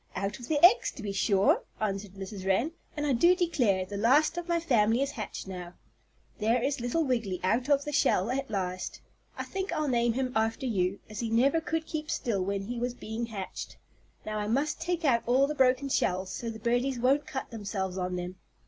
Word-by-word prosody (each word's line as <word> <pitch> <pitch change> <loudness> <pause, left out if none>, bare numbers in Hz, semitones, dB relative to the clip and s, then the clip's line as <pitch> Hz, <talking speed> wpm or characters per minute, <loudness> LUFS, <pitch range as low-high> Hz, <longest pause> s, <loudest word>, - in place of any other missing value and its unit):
"Out 195 +4 -3
of 240 - -9
the 310 - +1
eggs 445 +7 +5
to 240 - -9
be 205 - -2
sure," 195 0 +3 0.2
answered 200 -2 -2
Mrs. 195 0 -7
Wren. 195 +11 +1 0.3
"And 295 - -1
I 285 - +2
do 345 +9 +5
declare, 250 - +1
the 200 +2 -6
last 280 +10 +4
of 350 0 -4
my 340 -1 +2
family 240 -5 +3
is 280 - -2
hatched 215 -7 -6
now. 180 -2 -7 0.6
There 225 +3 +2
is 270 +3 -1
little 245 +8 0
Wiggily 230 - -1
out 240 +8 +1
of 285 -1 +3
the 295 - -3
shell 240 -7 +2
at 270 +1 -2
last. 185 -3 -3 0.4
I - - -2
think 390 0 -4
I'll 305 -1 0
name 240 -2 +2
him 255 +1 -1
after 225 +4 0
you, 195 -4 0
as 215 - -8
he 230 - -2
never 270 +8 +3
could 320 0 -2
keep 305 -1 -4
still 215 -8 -1
when 195 +1 -2
he 235 +4 -4
was 245 +1 -2
being 230 0 -4
hatched. 200 -4 -6 0.5
Now 215 0 -3
I 210 - -2
must 285 +8 0
take 345 -1 -1
out 235 -5 +4
all 260 +3 +4
the 295 - -2
broken 265 0 +3
shells 185 -7 0
so 235 - -4
the 225 - -6
birdies 245 +4 0
won't 265 +4 +2
cut 265 - -5
themselves 200 -4 -3
on 180 0 -2
them." 180 +1 -5
235 Hz, 215 wpm, -29 LUFS, 200-275 Hz, 0.6 s, eggs